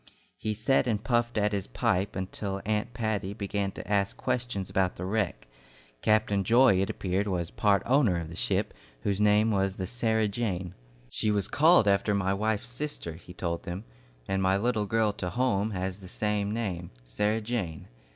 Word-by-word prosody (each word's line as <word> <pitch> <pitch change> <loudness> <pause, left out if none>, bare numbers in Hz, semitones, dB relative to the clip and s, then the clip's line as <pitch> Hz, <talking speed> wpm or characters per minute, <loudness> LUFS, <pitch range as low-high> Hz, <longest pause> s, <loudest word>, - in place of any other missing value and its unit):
He 110 0 -2
sat 125 +4 +2
and 105 -3 0
puffed 120 -1 +1
at 105 0 +2
his 100 -1 -2
pipe 100 -5 0
till 100 -2 -3
Aunt 110 +2 0
Patty 105 -4 -2
began 100 -1 -2
to - - -8
ask 100 -1 +1
questions 120 -6 -2
about 95 -1 0
the 90 - -5
wreck. 100 - -1 0.5
Captain 105 -2 +2
Joy, 115 -2 +5
it 95 - 0
appeared, 95 +2 -1
was 85 -4 -2
part 100 -2 +2
owner 120 -9 +3
of 85 - -5
the 80 - -8
ship, - - 0 0.3
whose 100 +5 0
name 105 +1 +4
was 95 -1 +1
the 95 - -3
"Sarah 110 0 +1
Jane." 95 -5 -2 0.4
"She 110 - 0
was 105 -2 +1
called 155 - +5
after 100 +1 +3
my 95 -1 +1
wife's 105 +2 -1
sister," 125 - -4
he 85 +2 -12
told 85 -1 -2
them, 90 +4 -5 0.4
"and 95 0 0
my 95 +1 +3
little 110 -1 0
girl 110 0 +2
to 90 -3 -4
home 110 -3 +1
has 95 -1 -3
the 95 - -10
same 105 +1 -1
name, 95 -7 -3 0.2
'Sarah 105 - 0
Jane.' 105 -8 -3
105 Hz, 180 wpm, -28 LUFS, 95-110 Hz, 0.5 s, Joy